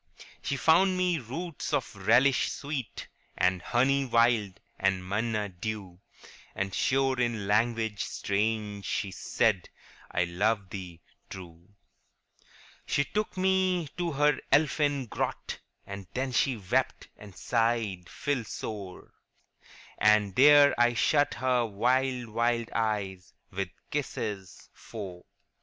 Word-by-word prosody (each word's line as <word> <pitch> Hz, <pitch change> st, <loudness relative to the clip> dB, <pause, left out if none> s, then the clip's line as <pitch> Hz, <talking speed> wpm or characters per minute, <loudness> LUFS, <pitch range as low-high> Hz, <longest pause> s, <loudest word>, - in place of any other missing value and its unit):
* -, -, -22 dB
She 140 Hz, -, -2 dB
found 185 Hz, +6 st, +4 dB
me 180 Hz, -3 st, +1 dB
roots 150 Hz, +6 st, -5 dB
of -, -, -1 dB
relish 125 Hz, +4 st, +3 dB
sweet, 140 Hz, -6 st, -5 dB, 0.3 s
And 90 Hz, -1 st, +2 dB
honey 135 Hz, +7 st, +2 dB
wild, 115 Hz, -6 st, +2 dB, 0.2 s
and 95 Hz, -1 st, 0 dB
manna 105 Hz, +1 st, -1 dB
dew; 95 Hz, -1 st, -6 dB, 0.6 s
And 100 Hz, 0 st, -2 dB
sure 135 Hz, -1 st, +1 dB
in 120 Hz, -4 st, 0 dB
language 110 Hz, 0 st, +1 dB
strange 105 Hz, 0 st, -2 dB
she 100 Hz, 0 st, -2 dB
said, 100 Hz, 0 st, 0 dB, 0.2 s
" -, -, -23 dB
I 90 Hz, -, +1 dB
love 95 Hz, +3 st, 0 dB
thee 90 Hz, -4 st, -8 dB, 0.3 s
true." 90 Hz, +1 st, -11 dB, 0.5 s
' -, -, -27 dB
She 140 Hz, -, +2 dB
took 210 Hz, -2 st, -3 dB
me 185 Hz, -3 st, +1 dB
to 170 Hz, -2 st, -1 dB
her 150 Hz, 0 st, +3 dB
elfin 145 Hz, -1 st, +2 dB
grot, -, -, -4 dB, 0.3 s
And 100 Hz, -2 st, -8 dB
there 130 Hz, 0 st, -2 dB
she 130 Hz, +1 st, +2 dB
gazed, 125 Hz, +6 st, -1 dB
and 105 Hz, -3 st, -13 dB
sighed 115 Hz, -6 st, 0 dB, 0.2 s
deep, 110 Hz, -7 st, -4 dB, 0.9 s
And 105 Hz, -2 st, +4 dB
there 145 Hz, +1 st, +7 dB
I 120 Hz, 0 st, +4 dB
shut 145 Hz, +4 st, +2 dB
her 125 Hz, -1 st, +1 dB
wild 125 Hz, +2 st, 0 dB
sad 115 Hz, 0 st, +1 dB
eyes 100 Hz, -4 st, -2 dB, 0.2 s
ŌĆö 95 Hz, +1 st, -1 dB
So 90 Hz, -, -22 dB, 0.2 s
kissed 145 Hz, -3 st, -2 dB
to 105 Hz, -3 st, -3 dB, 0.3 s
sleep. 95 Hz, -5 st, -8 dB
115 Hz, 125 wpm, -28 LUFS, 100-135 Hz, 0.9 s, there